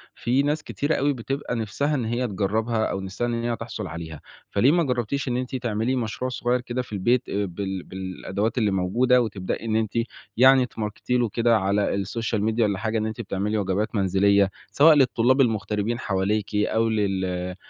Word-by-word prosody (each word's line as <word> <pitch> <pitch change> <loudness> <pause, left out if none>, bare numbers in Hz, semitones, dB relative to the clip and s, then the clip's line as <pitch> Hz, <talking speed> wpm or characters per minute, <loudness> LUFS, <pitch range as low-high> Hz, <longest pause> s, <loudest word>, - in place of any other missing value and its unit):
في 125 +4 +1
ناس 150 +2 0
كتيرة 145 +3 -1
أوي 145 +1 +1
بتبقى 135 +1 -4
نفسها 125 +7 -1
إن 125 -5 -1
هي 120 +3 -1
تجرّبها 110 +3 0
أو 95 - -2
نفسها 95 +5 -3
إن 120 - -1
هي 120 0 0
تحصل 115 -3 -6
عليها، 80 -2 -7 0.3
فَليه 120 +7 +3
ما 170 +1 +3
جربتيش 130 0 -1
إن 125 -1 0
أنتِ 130 +1 -3
تعملي 120 0 -1
مشروع 125 +1 -2
صغير 125 0 0
كده 125 +1 -3
في 125 - -10
البيت 120 +6 +1
آآ 100 +1 -1
بال 95 0 -4
بالأدوات 95 +4 -4
اللي 105 -4 +2
موجودة 115 +7 +3
وتبدئي 100 -2 -3
إن 110 -1 0
أنتِ 110 -2 0 0.4
يعني 130 +1 +6
تماركتي 110 +2 -3
له 120 -2 +1
كده 115 +1 +3
على 100 0 0
الSocial 115 +2 -2
media 110 - -4
والّا 100 -3 +2
حاجة 110 +1 -1
إن 110 - -1
أنتِ 110 +1 -4
بتعملي 105 +1 -2
وجبات 100 +2 -1
منزلية، 100 0 +3 0.2
سواء 155 +2 +6
للطلاب 130 -1 +3
المغتربين 110 -1 0
حواليكِ 105 0 -1
أو 110 +2 +1
لل 95 -4 -1
110 Hz, 185 wpm, -24 LUFS, 100-125 Hz, 0.4 s, يعني